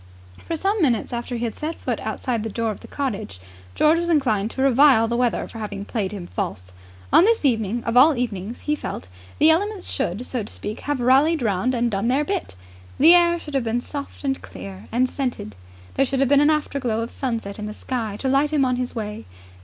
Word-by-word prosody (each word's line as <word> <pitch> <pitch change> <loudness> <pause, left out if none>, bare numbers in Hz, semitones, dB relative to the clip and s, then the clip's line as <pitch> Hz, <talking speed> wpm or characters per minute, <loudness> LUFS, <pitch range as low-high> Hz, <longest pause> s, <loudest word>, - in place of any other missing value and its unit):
For 335 - -1
some 395 +5 0
minutes 245 -6 +1
after 240 +1 -3
he 235 - -4
had 225 - -3
set 315 +2 -4
foot - - -3
outside 240 -4 -2
the 220 - -4
door 225 +1 -1
of 210 - -8
the - - -12
cottage, 215 - -4 0.4
George 315 +2 +4
was 345 0 -2
inclined 225 -10 +2
to 265 - -2
revile 270 -3 +5
the 235 - -1
weather 245 -1 0
for 225 - -9
having 205 -2 -5
played 205 -5 -2
him 195 -4 -6
false. 90 - -5 0.4
On - - +8
this 450 -5 +2
evening 230 -2 +1
of 230 - -2
all 275 +3 +6
evenings, 225 -2 -4
he 300 - -1
felt, 95 - -5 0.3
the 315 +1 +6
elements 400 +3 -1
should, 200 +8 -2
so 250 -2 -3
to 210 - -8
speak, 210 - -6
have 290 -2 -2
rallied 270 +5 +3
round 215 +4 +1
and 235 0 0
done 200 +3 -1
their 275 +4 +2
bit. 385 - -3 0.4
The 320 +5 +7
air 345 -1 +5
should 300 -3 -10
have 270 -3 +1
been 225 +2 0
soft 280 +4 -7
and 270 -1 -1
clear 95 +2 -10
and 250 +2 +2
scented: 250 - -4 0.4
there - - +2
should 270 0 -1
have 270 -2 +2
been 285 0 +5
an 295 - +5
afterglow 275 -7 0
of 230 - -4
sunset 225 -6 -4
in 210 - -4
the 210 - -6
sky 225 -5 -4
to 270 - -1
light 275 +3 +3
him 290 -3 +3
on 250 -1 0
his 250 0 -3
way. 215 -1 -5
250 Hz, 225 wpm, -23 LUFS, 220-290 Hz, 0.4 s, On